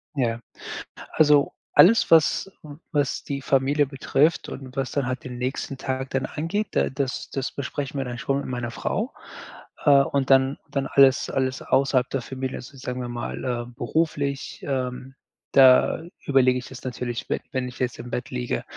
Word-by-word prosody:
Ja. 120 -4 0 0.7
Also, 150 -2 +4 0.2
alles, 225 +6 +6
was 165 +4 +4 0.4
was 145 -2 0
die 140 -1 -4
Familie 140 +2 +2
betrifft 145 +3 +1
und 130 -1 -9
was 135 -2 -2
dann 140 -3 0
halt 130 +1 -3
den 125 -1 -7
nächsten 130 +2 -3
Tag 130 0 -3
dann 135 - -1
angeht, 180 +8 -2
da - - +1
das 135 -1 -3
das 135 -2 -3
besprechen 140 +1 -4
wir - - 0
dann 120 -1 -5
schon 135 +2 -1
mit - - -5
meiner 120 -2 -3
Frau, 220 - -2 0.7
äh, 145 - +6
und 140 -1 -1
dann 135 +1 +4
dann 140 -1 -1
alles 135 -1 +4
alles 130 -1 -1
außerhalb 135 -2 +2
der 135 - -2
Familie 130 +1 -5
also 125 +3 -11
sagen 125 -1 -4
wir 125 - -4
mal, 120 0 -5
äh, 120 -2 -2
beruflich, 140 0 -2
ähm, 130 -1 -3 0.4
da 130 +3 +6 0.2
überlege 130 -2 +4
ich 125 - -9
das 130 -2 -11
natürlich, 120 -1 -4
wenn - - 0
wenn 130 -1 -2
ich 125 - -13
jetzt 125 -2 -2
im 120 - -7
Bett 125 +1 -3
liege. 125 -1 -2
135 Hz, 175 wpm, -24 LUFS, 125-140 Hz, 0.7 s, alles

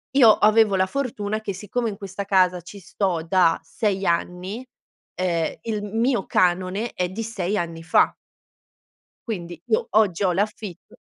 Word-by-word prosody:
Io 240 -5 +8
avevo 215 -1 +4
la 185 0 +3
fortuna 215 -3 -3
che 200 -3 -4
siccome 220 +4 -3
in 200 - -7
questa 195 -1 -6
casa 185 -2 +3
ci 200 +4 -11
sto 180 -3 -2
da 180 -2 +3
6 200 -4 -2
anni, 180 +7 -2 0.5
ehm, 170 -3 -1
il 215 -2 -3
m 210 +2 -3
mio 235 -4 +1
canone 185 +5 +1
è 180 -1 -1
di 215 +5 -5
6 210 -3 -2
anni 165 -3 -4
fa. 165 - +3 1.1
Quindi, 175 -6 -5
boh, 220 - +1
oggi 205 -3 +2
ho 185 - +3
l'affitt 200 -1 -4
195 Hz, 155 wpm, -23 LUFS, 180-215 Hz, 1.1 s, Io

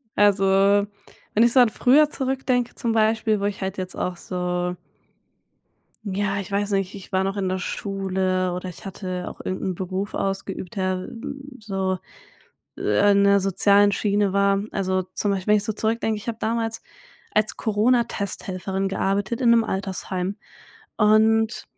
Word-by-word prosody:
Also, 205 -1 +4 0.9
wenn 220 - +4
ich 235 - +4
so 255 - +7
an 240 - +5
früher 285 +6 +4
zurückdenke 260 -3 -1
zum 235 - -1
Beispiel, 220 -1 +2
wo 200 - -2
ich 205 -1 -3
halt 190 +1 -3
jetzt 185 0 -5
auch 180 -1 -3
so 180 0 -2 1.3
ja, 200 0 -1
ich 195 - -8
weiß 200 +1 -1
nicht, 195 -1 -1
ich 195 -2 -10
war 190 0 +2
noch 195 +1 -2
in 190 -2 -1
der 185 - -1
Schule 185 -1 -1
oder 180 0 -5
ich 180 - -12
hatte 185 -2 -5
auch - - -10
irgend 185 - -3
'n 185 -1 -1
Beruf 190 +3 -4
ausgeübt, 195 -2 -3
der, 185 -1 0
hm, 275 +4 -7 0.2
so, 195 -3 -2 0.8
äh, 155 - +3
in 200 0 +4
der 200 0 +5
sozialen 200 +2 +4
Schiene 200 -1 +1
war. 200 0 +3
Also 190 -1 0
zum 205 - +1
Beispiel, 190 0 -3
wenn - - +6
ich 205 - -1
so 220 - -2
zurückdenke, 220 +1 0
ich 210 - -10
habe 225 -1 -3
damals 225 0 -2 0.5
als 215 0 +2
Corona-Testhelferin 205 -4 0
gearbeitet 195 +4 -1
in 240 - +4
'nem 230 -1 +5
Altersheim 190 -1 -3 0.6
und 220 +1 +3
200 Hz, 165 wpm, -23 LUFS, 190-220 Hz, 1.3 s, so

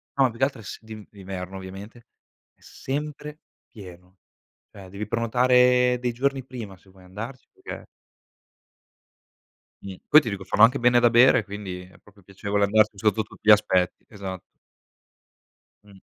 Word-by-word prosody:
No, 135 - +3
ma 130 - +3
più 115 - -12
che - - +1
altro 130 -4 -6
è - - -14
s 95 - -8
d'in 110 -2 -10
d'inverno, 95 -1 -8
ovviamente. 100 +5 -11 0.5
È - - -39
sempre 150 +2 -6 0.3
pieno. 90 -3 -14 0.5
Cioè, 95 -2 -13
devi 100 +3 -6
prenotare 125 +2 +3
dei 125 -1 -2
giorni 135 +2 -2
prima 115 -7 -9
se 95 - -24
vuoi 95 0 -20
andarci 110 +8 -9
perché - - -10 2.0
Mh. 95 -1 -8
Poi 155 - +9
ti 120 - -5
dico 100 -2 -6
fanno 105 +3 +2
anche 125 +5 +5
bene 120 0 +4
da 120 - +4
bere, 120 0 +5
quindi 100 -3 -7
è 90 0 -16
proprio 105 -1 -22
piacevole 100 +2 -2
andarci 110 0 +2
sotto 105 +1 +1
tutti - - -18
gli - - +9
aspetti, 95 -4 +2
esatto. 95 -4 -7 1.4
Mh. 100 -2 -18
105 Hz, 160 wpm, -24 LUFS, 95-125 Hz, 2.0 s, Poi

